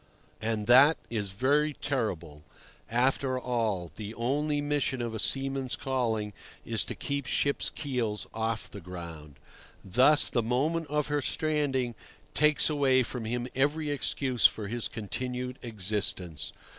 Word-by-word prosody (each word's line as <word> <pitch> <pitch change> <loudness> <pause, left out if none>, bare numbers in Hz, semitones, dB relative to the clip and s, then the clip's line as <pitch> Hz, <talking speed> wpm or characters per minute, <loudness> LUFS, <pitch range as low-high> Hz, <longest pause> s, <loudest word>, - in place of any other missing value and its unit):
And 110 -1 -1
that 135 +7 +7
is 105 -4 -2
very 145 +9 +2
terrible. 90 - -3 0.5
After 130 +2 +1
all, 110 -9 -1
the 105 +1 -6
only 145 +5 0
mission 145 -3 0
of 120 -1 -3
a 110 - -3
seaman's 135 -1 0
calling 115 -6 -1 0.3
is - - 0
to - - -4
keep 140 -2 -3
ships' 140 +2 +1
keels 120 -7 -3
off 110 0 -2
the 100 - -10
ground. 85 -4 -9 0.5
Thus 130 +10 +5
the 120 - +2
moment 145 +8 0
of 150 +1 -1
her 145 0 +1
stranding 140 -6 0 0.4
takes 150 +1 +4
away 135 -4 +3
from 120 -1 -5
him 120 +2 -2
every 145 +3 +1
excuse 130 -3 +3
for 105 -2 -6
his 120 +2 -2
continued 125 +3 -4
existence. 95 - 0
125 Hz, 135 wpm, -29 LUFS, 110-140 Hz, 0.5 s, that